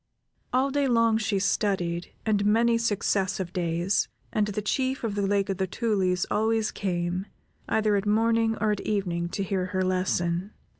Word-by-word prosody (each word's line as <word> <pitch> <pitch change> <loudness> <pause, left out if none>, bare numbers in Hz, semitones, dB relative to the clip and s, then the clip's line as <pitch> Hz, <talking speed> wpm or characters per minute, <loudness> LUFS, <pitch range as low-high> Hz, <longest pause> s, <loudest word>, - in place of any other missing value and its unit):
All 265 +2 +2
day 285 0 +1
long 230 -2 +3
she 215 -2 0
studied, 185 -3 0
and 210 -2 +2
many 230 +3 +3
successive 195 -4 0
days, 175 +1 0 0.3
and 210 -1 +2
the 210 0 -2
Chief 260 +5 -1
of 225 -3 -1
the 205 - -1
Lake 200 0 +1
of 195 -2 -2
the 190 0 -1
Tulies 190 -4 0
always 220 +1 +1
came, 180 0 -2 0.4
either 215 -1 +2
at 200 +1 -1
morning 225 +1 +2
or 215 0 +2
at 205 - -2
evening, 175 -5 -1
to 200 - -2
hear 185 -1 -1
her 185 0 -1
lesson. 185 0 0
205 Hz, 165 wpm, -26 LUFS, 185-220 Hz, 0.4 s, long